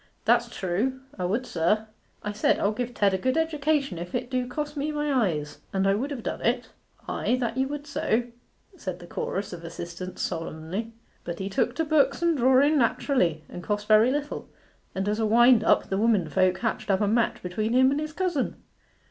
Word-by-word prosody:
'That's - - +3
true: 210 +9 -1 0.2
'a 180 - 0
would, 230 +7 -1
sir.' 210 +4 +1 0.4
'I 210 - -2
said, 210 +1 +2
I'll 200 - +1
give 245 +3 -3
Ted 200 -2 +3
a 190 - 0
good 260 +8 0
education 300 - 0
if 175 +1 -6
it 245 +1 -3
do 255 -1 0
cost 295 +4 -4
me 295 +1 -1
my 295 -1 -1 0.2
eyes, 150 -2 -5
and 195 0 0
I 195 - +4
would 250 +8 -1
have 270 -6 -5
done - - -4
it.' 245 +1 0 0.4
'Ay, 245 - 0
that 240 -2 -1
you 265 0 +1
would 290 +1 -5
so,' 245 -5 0 0.5
said 185 - -5
the 175 - -12
chorus 195 +3 -4
of 170 -1 -8
assistants 170 +2 -6
solemnly. 165 +6 -4 0.3
'But 170 -1 -5
he 195 0 -4
took 235 +4 0
to 325 - 0
books 295 0 +2
and 340 -1 +3
drawing 270 +3 +4
naturally, 220 - +1
and 175 - -8
cost 205 +3 -2
very 215 +2 +6
little; 290 +2 -3 0.5
and 190 +1 -1
as 210 +1 0
a 220 - +2
wind 240 +1 +6
up - - +3
the 195 - 0
womenfolk 190 -4 +2
hatched 225 -1 -2
up 195 0 +2
a 205 - +2
match 230 +3 +1
between 215 +5 -2
him 260 +1 +5
and 280 - 0
his 305 0 -4
cousin. 350 -5 -1
225 Hz, 205 wpm, -26 LUFS, 190-275 Hz, 0.5 s, very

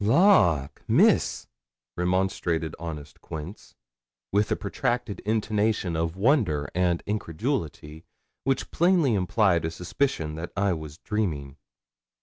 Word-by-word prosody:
'Lawk, 100 - +4
Miss!' - - +3 0.5
remonstrated 90 -3 0
honest 75 -4 -7
Quince, 80 +5 -8 0.6
with 105 +1 +1
a - - +3
protracted 120 +1 -2
intonation 105 -4 0
of 80 +1 -1
wonder 95 - +2
and 90 -1 +1
incredulity, 80 - -3 0.4
which 135 0 -1
plainly 170 -7 +3
implied 95 -3 +2
a 80 - -1
suspicion 85 - -2
that 80 +2 -6
I 100 -1 +2
was 80 -2 -7
dreaming. 80 -11 -3
90 Hz, 110 wpm, -26 LUFS, 80-110 Hz, 0.6 s, Lawk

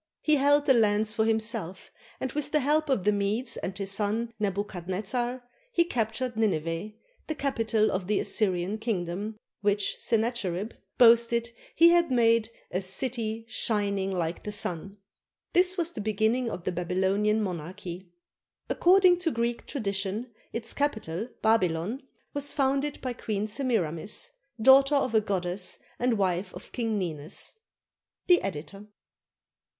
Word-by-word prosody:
He 305 -1 +4
held 290 +1 +4
the 265 - +6
lands 215 -2 +2
for 220 - +1
himself, 220 -4 -1 0.3
and 260 - -3
with 295 +1 -3
the 300 0 +2
help 300 +3 +1
of 255 -9 +1
the 210 - +4
Medes 205 +5 -1
and 190 0 -4
his 195 -1 -2
son 215 +3 -1
Nebuchadnezzar 205 +5 -2 0.2
he 340 - +4
captured 240 -4 -2
Nine 215 -7 +2
veh, 165 +7 -5 0.3
the 315 - -2
capital 225 -6 +1
of 185 -1 -2
the 210 0 +1
Assyrian 190 0 +1
kingdom, 210 -1 -3 0.2
which 205 -1 0
Sennacherib 220 -3 -1 0.2
boasted 235 0 +5 0.2
he 335 +1 +7
had 340 -1 +4
made 230 -3 +3 0.2
"a 185 - -1
city 225 +3 -1
shining 200 -4 0
like 170 -2 -2
the 210 - -5
sun." 195 -1 -4 0.6
This 365 +1 +5
was 340 -1 0
the 215 - -6
beginning 220 +4 +1
of 180 - -6
the 185 - -1
Babylonian 190 +4 +1
monarchy. 180 -1 -5 0.6
According 360 0 +5
to 355 -2 +1
Greek 235 -3 -2
tradition, 205 -1 -3 0.2
its 230 -1 -1
capital, 220 - -2
Babylon, 210 - +1 0.3
was 285 0 -2
founded 275 +1 0
by 255 -2 -3
Queen 215 -3 -3
Semiramis, 210 - -1 0.3
daughter 270 +4 +6
of 260 -4 +1
a 220 - +4
goddess 185 -2 -2 0.2
and 245 -2 +1
wife 185 -1 -1
of 180 - -10
King 225 -3 -1
Ninus. 160 -3 -3 0.7
The 355 -1 +5
Editor. 195 +3 -6
220 Hz, 140 wpm, -28 LUFS, 195-250 Hz, 0.7 s, he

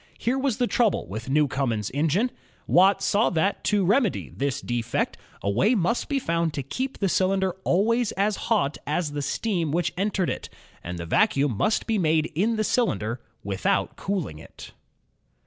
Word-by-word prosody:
Here 255 +3 0
was 265 -4 0
the 245 - +2
trouble 230 -3 +1
with 110 +6 -6
New 150 +2 +3
comen's 120 -6 -1
engine. 165 - +1 0.3
Watt 195 +2 +4
saw 210 +3 +3
that, 185 +4 0
to 205 -2 +2
remedy 215 +2 +1
this 140 -1 -1
defect, 120 -1 -2 0.3
a 100 - 0
way 195 - +3
must 225 - 0
be 285 - +1
found 165 - 0
to 140 - -2
keep 260 - -4
the 195 - 0
cylinder 190 +1 +1
always 230 +5 +2
as 205 +2 +1
hot 180 -11 +1
as 150 +1 -1
the 145 0 -3
steam 170 +3 -1
which 170 +1 0
entered 195 -1 0
it, - - -6 0.3
and 90 0 -5
the 85 - -5
vacuum 135 - +2
must 215 - +1
be 220 -2 0
made 160 -2 +2
in 210 +9 +1
the 215 - 0
cylinder, 120 - 0 0.2
without 95 -1 0
cooling 175 - -3
it. - - -12
175 Hz, 175 wpm, -25 LUFS, 140-215 Hz, 0.3 s, Watt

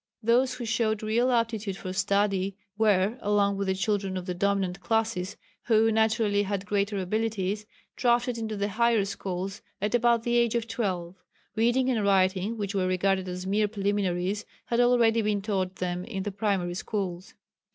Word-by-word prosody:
Those 245 +3 +3
who 245 - -5
showed 220 -1 0
real 230 +4 +2
aptitude 225 -4 0
for 185 -1 -6
study 195 0 +1 0.2
were, 210 +1 +2
along 200 -1 +2
with 200 0 -2
the 190 - +1
children 195 -1 -1
of 180 - -5
the 180 - -2
dominant 195 0 0
classes 205 -1 -1 0.3
who 225 -1 +4
naturally 220 -2 +2
had 200 -1 -2
greater 205 0 0
abilities, 210 +1 -2 0.3
drafted 240 -2 +1
into 220 -2 -3
the 200 +1 -1
higher 230 -1 +2
schools 190 0 -4 0.2
at 210 +3 -1
about 235 -1 +3
the 240 0 +1
age 235 -1 +2
of 230 -1 -1
twelve. 185 -6 -3 0.4
Reading 240 +3 +2
and 225 -4 0
writing, 195 +2 +2
which 200 -1 -3
were 190 -2 +1
regarded 185 0 +1
as 180 +1 -5
mere 210 +2 +2
preliminaries, 200 -1 -1 0.2
had 235 - 0
already 240 -2 +4
been 210 -1 0
taught 190 -3 -1
them 180 0 -3
in 195 -5 -4
the 205 - -3
primary 195 -3 -1
schools. 185 0 -4
205 Hz, 170 wpm, -27 LUFS, 190-225 Hz, 0.4 s, who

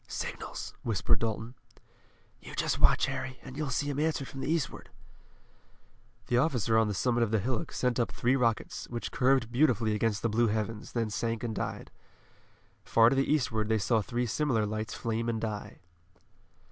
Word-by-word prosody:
"Signals," - - -5
whispered 105 -5 +1
Dalton. 115 +1 -2 0.9
"You - - -9
just - - 0
watch, - - +5
Harry, 130 0 -4
and 130 -1 -9
you'll 150 -1 -2
see 140 +3 -1
'em 140 - -3
answered 150 -3 0
from 135 - -8
the 135 - -1
eastward." 165 -5 -2 1.4
The 125 - +2
officer 125 -7 +1
on 110 -1 +4
the 105 - -2
summit 120 +3 +1
of 115 - +2
the 110 - +2
hillock 115 +3 -2
sent 125 -1 0
up 120 - +1
three 125 +3 +1
rockets, 115 -4 0
which 120 -1 -4
curved 130 -2 +2
beautifully 120 -5 +3
against 105 -1 0
the - - +3
blue 115 +2 +3
heavens, 110 0 -3
then 115 -3 -1
sank 115 +1 -2
and 115 -2 -2
died. - - -4 0.9
Far 115 +1 +5
to - - +2
the 135 +1 +1
eastward 110 -7 +1
they 110 - +3
saw 110 +2 +2
three 120 +4 -2
similar 120 -2 +1
lights 110 +1 -3
flame 115 0 -2
and 115 -1 -1
die. 110 -2 -5
115 Hz, 180 wpm, -30 LUFS, 110-130 Hz, 1.4 s, watch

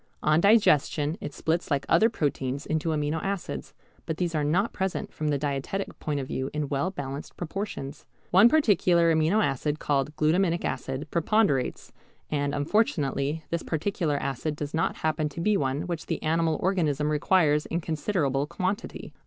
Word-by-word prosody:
On 155 +2 +4
digestion 160 -7 +3
it - - -5
splits 160 +4 -1
like 140 -2 0
other 225 - +5
proteins 140 - -2
into 160 +1 -1
amino 155 0 -1
acids, 195 - -4 0.3
but 160 - -2
these 175 -2 -1
are 155 -2 0
not 180 +9 +1
present 190 -1 -3
from 155 - -3
the 145 -1 +1
dietetic 145 +7 -3
point 150 -2 -2
of 135 - -3
view 130 +1 -3
in 150 -2 -2
well 140 +6 0
balanced 140 -5 -6
proportions. 165 -6 -5 0.2
One 195 +6 +7
particular 180 - +4
amino 165 +7 +3
acid, 145 +2 -1
called 145 0 -1
glutaminic 170 +3 +2
acid, 135 +3 -3
preponderates, 170 - +1 0.4
and 145 -1 0
unfortunately 145 -3 0
this 170 0 0
particular 160 -2 -1
acid 140 +3 -2
does 145 -1 -5
not 160 +1 0
happen 155 -1 -1
to 150 - -8
be 210 +5 +2
one 135 -4 0
which 170 -3 -4
the - - -3
animal 160 0 +1
organism 155 -6 +1
requires 150 -1 +2
in 170 - -1
considerable 155 -4 -1
quantity. 185 +6 -4
155 Hz, 160 wpm, -27 LUFS, 145-175 Hz, 0.4 s, One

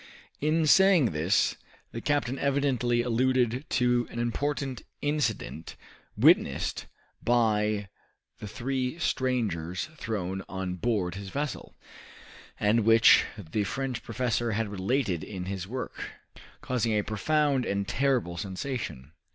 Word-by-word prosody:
In 155 +2 +2
saying 180 - +5
this, 80 +4 +1 0.3
the 115 - -6
captain 135 -2 0
evidently 135 -4 +1
alluded 125 +2 +1
to 125 -1 +2
an - - -9
important 135 +2 -2 0.2
incident 125 - -2 0.4
witnessed - - +3 0.3
by 105 -3 +2 0.5
the 105 - -6
three 130 +5 -2
strangers 110 - -1
thrown 95 -5 -3
on 95 -1 -3
board 95 -2 -1
his 100 +1 -7
vessel, 145 +3 -4 0.8
and 105 +3 +3
which 115 0 +6
the 100 +1 -2
French 130 +3 -3
professor 120 -2 -1
had 110 0 -1
related 100 - -1
in 95 -4 -6
his 95 -1 -4
work, 125 +4 -5 0.5
causing 120 -3 0
a 105 - +1
profound 140 +5 +1
and 100 -2 -2
terrible 130 -11 0
sensation. 95 - -5
120 Hz, 115 wpm, -28 LUFS, 100-130 Hz, 0.8 s, which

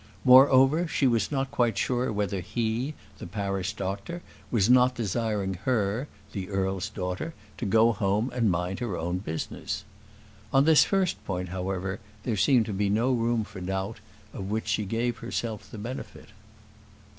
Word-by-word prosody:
Moreover, 135 +5 +7
she 145 - 0
was 120 0 +2
not 135 -1 -1
quite 120 -2 +1
sure 125 -1 0
whether 100 -2 -1
he, 115 - -2 0.2
the - - -7
parish 100 -1 -2
doctor, 100 - -4 0.3
was 110 -5 +2
not 125 +1 +5
desiring 105 -2 -1
her, 115 +1 +1 0.2
the 95 -2 -5
earl's 95 0 -1
daughter, 90 - -4 0.2
to 115 - -2
go 115 +3 +5
home 105 +2 0
and 115 -4 +2
mind 90 +1 -1
her 115 -8 -2
own 90 +3 -2
business. 80 -5 -4 0.7
On 135 +1 +4
this 160 -1 +7
first 190 -2 0
point, 90 -2 -3
however, 95 +1 -3 0.2
there 115 - -1
seemed 110 +4 +4
to 105 - -4
be 100 +1 0
no 115 +6 +2
room 115 -1 +1
for 105 -3 -10
doubt, 95 +4 -3 0.3
of 95 0 -5
which 110 +1 -2
she 110 -1 0
gave 115 +4 -1
herself 115 -2 -4
the 110 - -9
benefit. 120 +5 -7
110 Hz, 160 wpm, -27 LUFS, 95-125 Hz, 0.7 s, Moreover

